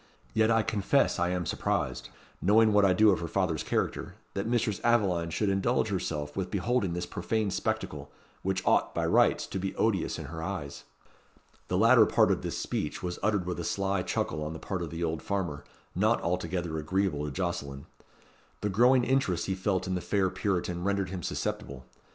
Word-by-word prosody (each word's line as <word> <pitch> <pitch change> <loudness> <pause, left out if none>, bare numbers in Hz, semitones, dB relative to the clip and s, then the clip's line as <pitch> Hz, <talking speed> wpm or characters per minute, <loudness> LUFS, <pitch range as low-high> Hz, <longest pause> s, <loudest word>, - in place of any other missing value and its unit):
Yet 110 0 +3
I 115 -1 +3
confess 100 -5 +1
I 90 0 +1
am 90 -1 -1
surprised - - -2 0.3
knowing 110 +3 +5
what 105 0 +5
I 95 - +5
do 105 +3 +5
of 95 - +1
her 85 - -4
father's 85 -3 0
character - - -2 0.2
that 100 +2 -2
Mistress 115 -4 0
Aveline 95 -8 +2
should 105 +6 -1
indulge 100 +4 +1
herself 75 -6 -3
with 95 -2 -2
beholding 100 -1 0
this 90 0 -3
profane 105 +4 -1
spectacle, - - -3 0.3
which 95 0 -2
ought, - - +2
by - - 0
rights, - - +3
to 95 - -4
be 95 +1 -3
odious 100 -6 0
in 80 - -6
her 80 +3 -7
eyes." 80 -6 -5 0.8
The 90 - 0
latter 115 +2 +6
part - - +4
of - - 0
this - - -4
speech - - -3
was 90 -1 -3
uttered 105 -4 +1
with 90 -1 -3
a - - -3
sly 100 +2 0
chuckle 75 -3 -2
on 75 +1 -4
the 80 - -7
part 95 -3 -4
of 85 - -4
the 85 +2 -4
old 80 -1 -1
farmer, 90 -8 -3 0.3
not - - +2
altogether 85 -2 -2
agreeable 80 -2 0
to 75 - -4
Jocelyn. 70 -5 -3 0.8
The 105 - 0
growing 125 +6 +4
interest 130 -9 +1
he 95 - -1
felt 95 0 -1
in 95 - -2
the 90 - -1
fair 95 -1 +1
Puritan 90 -2 -2
rendered 100 -1 0
him 95 -2 -4
susceptible. 65 -4 -4
95 Hz, 190 wpm, -29 LUFS, 85-105 Hz, 0.8 s, latter